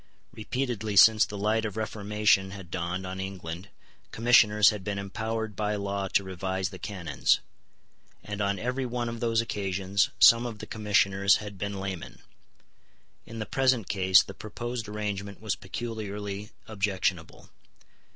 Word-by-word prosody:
Repeatedly 110 -2 -3
since 110 +2 +7
the 105 0 -7
light 110 +2 +1
of 110 -1 -4
reformation 105 -2 +1
had 95 -3 -10
dawned 90 +1 -3
on 95 +1 -5
England 95 -1 -6 0.4
Commissioners 110 -2 +5
had 105 -3 -6
been 100 0 -3
empowered 110 +2 -4
by 105 0 -1
law 100 -1 -2
to 100 - +1
revise 95 0 -3
the 95 -2 -10
canons; 85 -8 0 0.8
and 105 0 -5
on 100 0 0
every 125 +6 -2
one 120 0 -2
of 115 0 -5
those 115 -1 +1
occasions 100 -2 0
some 115 +1 +7
of 115 -3 -7
the - - -8
Commissioners 100 -2 +2
had 105 -2 -6
been 100 0 -3
laymen. 95 -3 -6 1.1
In 115 - -8
the 110 - -3
present 130 -5 +1
case 95 -1 +5
the 100 - -9
proposed 120 +2 -6
arrangement 100 -2 -4
was 110 -2 -2
peculiarly 105 0 -5 0.2
objectionable. 95 -4 -2
105 Hz, 145 wpm, -28 LUFS, 95-110 Hz, 1.1 s, since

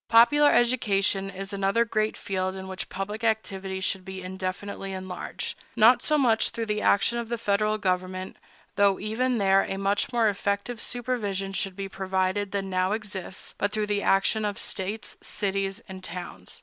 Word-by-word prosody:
Popular 290 +6 +7
education 200 -6 +2
is 195 +1 -5
another 200 +4 +2
great 215 -1 0
field 190 -1 -2
in 190 0 -7
which 190 0 -5
public 205 +4 -4
activity 195 -4 -1
should 190 0 -1
be 190 0 -7
indefinitely 190 +1 -4
enlarged, 185 -1 -5 0.2
not 235 +3 +6
so 305 - +2
much 235 -6 +3
through 230 - -3
the 210 -1 -1
action 235 +4 +3
of 235 -1 -5
the 235 - -1
Federal 215 0 +1
government,—though 185 +1 -1
even 240 +4 0
there 195 -1 +4
a 195 - -3
much 195 +3 +1
more 235 -2 +3
effective 200 +3 -1
supervision 210 -6 -2
should 195 -1 -2
be 195 0 -4
provided 190 +1 -1
than 195 -1 -2
now 185 +1 +1
exists,—but 205 -1 -3
through 215 0 0
the 205 -1 0
action 205 +3 +3
of 205 -1 -1
States, 215 -2 -5
cities, 195 +1 -2
and 190 -1 -9
towns. 170 - -7
200 Hz, 160 wpm, -27 LUFS, 190-220 Hz, 0.2 s, Popular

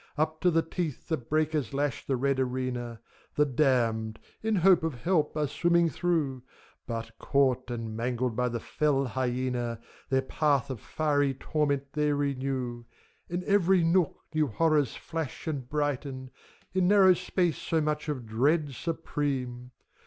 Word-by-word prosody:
Up 155 +1 0
to 180 - +4
the 165 -1 +2
teeth 165 -5 -4
the 160 - +2
breakers 150 +2 -1
lash 140 -3 -1
the 135 - +1
red 135 +1 +1
arena; 125 -2 -2 0.4
The 150 - +4
Damned, 120 -6 +1 0.2
in 220 0 +1
hope 185 -1 +5
of 160 -4 -2
help, 160 -4 +1
are 150 - +2
swimming 170 +3 +2
through; 150 -8 0 0.5
But, 115 -1 -5
caught 135 -3 +1
and 115 -2 -4
mangled 120 +1 -1
by 125 +1 +1
the 120 0 -3
fell 140 +2 +1
hyena, 125 -1 -2 0.3
Their 130 -1 +2
path 140 -1 +1
of 125 - -5
fiery 145 -3 +1
torment 140 -1 -1
they 150 0 +1
renew. 130 -4 -2 0.4
In 175 +1 -2
every 190 -3 +4
nook 170 -1 +2 0.2
new 155 -1 +2
horrors 150 +1 +2
flash 160 -5 -5
and 140 -6 -4
brighten, 140 -3 -2 0.4
In 185 -1 +2
narrow 195 -2 +7
space 180 -1 0
so 165 - 0
much 150 0 -1
of 130 -5 -3
dread 140 +7 +1
supreme! 135 -6 -3
140 Hz, 150 wpm, -29 LUFS, 125-160 Hz, 0.5 s, narrow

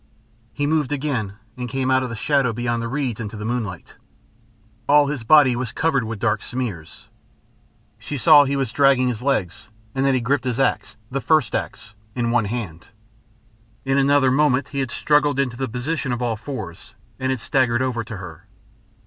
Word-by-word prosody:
He 145 - -2
moved 150 -2 0
again, 135 -9 -2 0.2
and 125 -1 -5
came 130 +1 -1
out 130 0 +4
of 130 - -3
the 115 - -5
shadow 135 +1 +1
beyond 120 0 -2
the 115 - -3
reeds 125 -3 -2
into 110 -1 -6
the 105 - -6
moonlight. 110 -7 -4 0.9
All 145 0 +6
his 140 -4 -3
body 135 0 +6
was 120 -2 -3
covered 140 -7 0
with 110 0 -5
dark 105 0 0
smears. 110 -11 -6 0.9
She 145 - -5
saw 145 +4 +7
he 140 +1 -1
was 135 -5 -1
dragging 135 -2 +3
his 120 -2 -4
legs, 115 -10 -2 0.2
and 135 - -1
that 135 -1 +3
he - - +2
gripped 130 +3 0
his 125 0 -2
axe, 135 - 0
the 135 +1 -2
first 155 -8 +2
axe, 100 - -4 0.2
in 120 -2 0
one 120 -3 +2
hand. 100 -7 -5 1.0
In 135 +1 +2
another 140 -1 +4
moment 140 -1 +2
he 140 - -4
had 135 -2 -1
struggled 145 +2 +2
into 125 -3 0
the 130 0 -3
position 130 +4 -3
of 120 - -2
all 120 -2 -1
fours, 110 -8 -8 0.2
and 130 - -1
had 130 -1 -1
staggered 120 0 +1
over 120 -3 -2
to 110 -1 -8
her. 90 0 -10
125 Hz, 190 wpm, -22 LUFS, 115-140 Hz, 1.0 s, saw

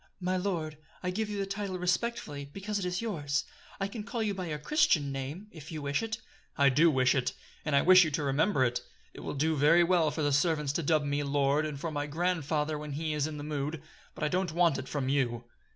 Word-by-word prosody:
"My 185 0 0
lord, 170 -5 -2 0.2
I 180 - 0
give 215 +3 -2
you 205 - -3
the 200 - -1
title 195 -1 -3
respectfully, 180 -5 -1
because 200 +8 -4
it 190 - -3
is 180 +4 -2
yours. 150 -9 -1 0.4
I 195 - 0
can 210 +2 -6
call 230 +1 -3
you 210 -2 0
by 185 -2 -4
your 150 -2 -3
Christian 150 - +2
name, 135 +8 -5
if 160 -1 -11
you 155 - -4
wish 140 0 0
it." 225 0 -3 0.4
"I 140 -1 +6
do 150 +6 +5
wish 130 -4 +3
it: 130 -2 0 0.3
and 150 -2 0
I 140 - +4
wish 185 0 +8
you 160 - 0
to 150 0 -2
remember 145 +3 +2
it. 120 0 -1 0.3
It - - -11
will - - -5
do 155 +3 +1
very 150 +5 +5
well 170 -3 +3
for 155 +1 -3
the 145 - +2
servants 150 -1 +2
to 170 - 0
dub 155 0 +2
me 145 0 0
'lord' 145 +1 +1
and 145 -2 -6
for 165 +2 -3
my 145 -1 -2
grandfather 155 -2 -1
when 150 -1 -6
he 155 +2 -2
is 150 0 0
in 155 -1 -6
the 145 - -6
mood; 150 +1 -3 0.4
but - - -5
I - - +3
don't 180 +2 0
want 170 -3 +3
it 130 - -7
from 140 -3 -2
you." 125 -4 0
155 Hz, 245 wpm, -30 LUFS, 145-180 Hz, 0.4 s, wish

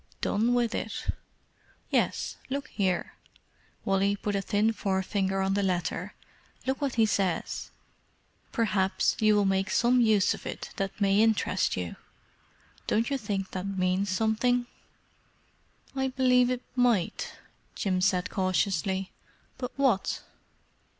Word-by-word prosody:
"Done 230 +4 +1
with 240 -2 +1
it?" - - -4 0.8
"Yes. - - 0
Look 280 +2 -3
here," 185 -4 -1 0.7
Wally 195 +1 +2
put 205 0 -3
a 200 - +1
thin 210 +3 +1
forefinger 190 -1 0
on 190 0 +1
the 200 - +1
letter. 180 0 -1 0.5
"Look 265 +2 -1
what 275 -3 -1
he 225 -2 +5
says—'Perhaps 195 +1 -2
you 215 -1 +4
will 205 -1 +3
make 195 0 +1
some 245 +1 +3
use 215 -4 +4
of - - -8
it - - -6
that 195 +1 -3
may 200 0 +4
interest 220 -3 +2
you.' 90 -2 -4 0.9
Don't 230 +5 +1
you 275 - +1
think 200 -4 -3
that 185 +1 -4
means 190 +1 0
something?" 225 +5 +1 1.3
"I 265 0 +1
believe 255 -1 +3
it 250 0 -2
might," 240 -8 +1 0.4
Jim 185 -2 0
said 185 -1 +2
cautiously. 190 0 0 0.5
"But 250 - -3
what?" 265 -8 +1
205 Hz, 125 wpm, -28 LUFS, 190-235 Hz, 1.3 s, he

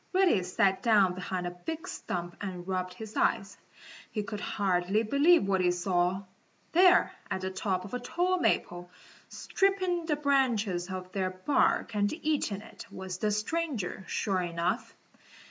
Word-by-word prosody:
Reddy 370 - +4
sat 190 +1 +1
down 210 -6 +4
behind 185 0 -4
a 175 - -2
big 315 - -6
stump 175 0 -5
and 185 -3 -5
rubbed 185 -1 -2
his 220 +1 -9
eyes. 200 -3 +1 0.5
He 210 - -3
could 205 0 -5
hardly 195 +1 0
believe 285 - +4
what 190 -1 +2
he 180 - +3
saw. 180 +1 0 0.5
There 360 +1 +5 0.2
at 190 - -2
the 190 0 -3
top 185 -1 -2
of 200 - -9
the 250 - -2
tall 350 +8 0
maple, 175 - 0 0.4
stripping 370 -4 0
the 300 - +2
branches 235 -11 +1
of 185 -1 -6
their 190 -1 -1
bark 185 +4 +1
and 205 0 +2
eating 300 - -1
it, - - -12
was 185 -1 -6
the 215 - +1
stranger, 215 - -2
sure 190 0 0
enough. 170 -1 -2
200 Hz, 155 wpm, -29 LUFS, 185-280 Hz, 0.5 s, There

